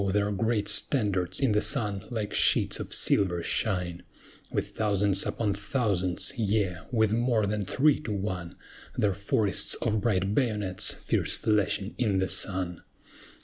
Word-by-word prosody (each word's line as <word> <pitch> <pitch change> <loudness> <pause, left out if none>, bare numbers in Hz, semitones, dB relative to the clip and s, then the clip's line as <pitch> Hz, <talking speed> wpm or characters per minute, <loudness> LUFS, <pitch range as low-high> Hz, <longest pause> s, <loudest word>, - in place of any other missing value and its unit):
their 105 +1 +1
great 105 +1 0
standards 105 -4 0
in 135 -5 +2
the 105 0 +2
sun 105 -8 +1
like 110 -4 -4
sheets - - +3
of - - -6
silver 90 -4 +3
shine: 90 -5 -1 0.5
With - - -2
thousands 100 -2 0
upon 105 -3 -1
thousands, 100 -4 -1
yea, 105 -5 0
with 110 -3 +2
more 120 -2 +1
than 105 +1 -2
three 135 +9 +2
to 120 - -6
one, 95 -4 -4 0.4
Their 100 -2 +2
forests 100 0 +1
of 110 -1 -1
bright 100 -3 0
bayonets 105 -7 0
fierce - - 0
flashing 105 -1 0
in 105 -6 +1
the 95 0 +1
sun. 90 -2 -2
105 Hz, 145 wpm, -28 LUFS, 95-110 Hz, 0.5 s, sheets